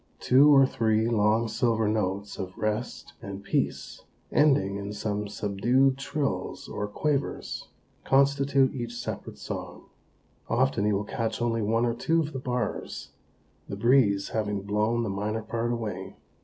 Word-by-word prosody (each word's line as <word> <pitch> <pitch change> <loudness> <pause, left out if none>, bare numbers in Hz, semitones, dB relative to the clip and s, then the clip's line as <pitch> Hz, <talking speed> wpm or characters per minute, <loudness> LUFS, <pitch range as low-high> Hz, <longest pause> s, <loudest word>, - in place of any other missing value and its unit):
Two 135 +4 +6
or 135 -2 +7
three 110 -3 +1
long, 110 0 +2
silver 115 -1 +1
notes 100 -1 -2
of 95 -1 -6
rest 110 +3 -3
and 100 0 -7
peace, - - -2 0.3
ending 100 -10 +3
in 100 +1 -5
some 105 0 -3
subdued 120 +7 +1
trills 135 -9 -3
or 105 - -4
quavers, 140 +6 -2 0.4
constitute 140 0 +3
each 120 -3 -5
separate - - -6
song. - - -7 0.7
Often 85 +9 +2
you 105 - +2
will 100 - -1
catch 115 +2 -3
only 115 -1 0
one 115 +3 +1
or 120 - +1
two 165 +8 +1
of 155 -1 -2
the 130 - -3
bars, 125 -1 -3 0.6
the - - -3
breeze 105 -4 +3
having 105 -3 -2
blown 105 +3 0
the 110 - -2
minor 105 +3 -2
part 115 +2 -2
away. 105 -6 -4
115 Hz, 145 wpm, -27 LUFS, 105-130 Hz, 0.7 s, or